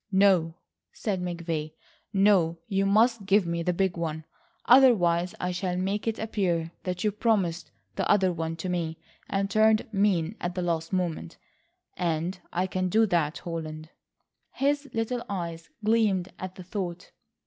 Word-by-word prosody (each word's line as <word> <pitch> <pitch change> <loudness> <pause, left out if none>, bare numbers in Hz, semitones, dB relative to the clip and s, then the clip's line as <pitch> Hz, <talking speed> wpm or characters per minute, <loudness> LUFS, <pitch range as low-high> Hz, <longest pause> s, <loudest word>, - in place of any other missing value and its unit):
"No," 190 -4 +4 0.4
said 195 -4 -3
McVay, 170 -3 -3 0.4
"no. 195 -5 +3
You 195 0 +1
must 215 0 +3
give 200 0 +4
me 170 0 -2
the 180 - +1
big 185 0 0
one. 160 -2 -3 0.4
Otherwise 185 -9 +5
I 180 - -1
shall 180 0 -2
make 195 +4 -2
it 225 - 0
appear 175 -7 -1
that 180 -1 -2
you 210 - +2
promised 195 -6 0 0.3
the - - -1
other 190 -3 +4
to 165 +1 -4
me, 170 -3 -2 0.3
and 195 0 0
turned 215 +1 +3
mean 195 -1 +1
at 175 0 -3
the 180 - -1
last 165 -2 -1
moment. 170 - -2 0.6
And 175 +1 -1
I 180 +2 0
can 185 0 -1
do 220 +5 +4
it, 210 - 0 0.2
Holland." 160 -2 -6 0.6
His 285 +1 0
little 235 +2 -2
eyes 170 -4 -5
gleamed 210 -5 +2
at 185 0 -6
the 185 - -9
thought. 180 -1 -5
185 Hz, 150 wpm, -27 LUFS, 170-205 Hz, 0.6 s, Otherwise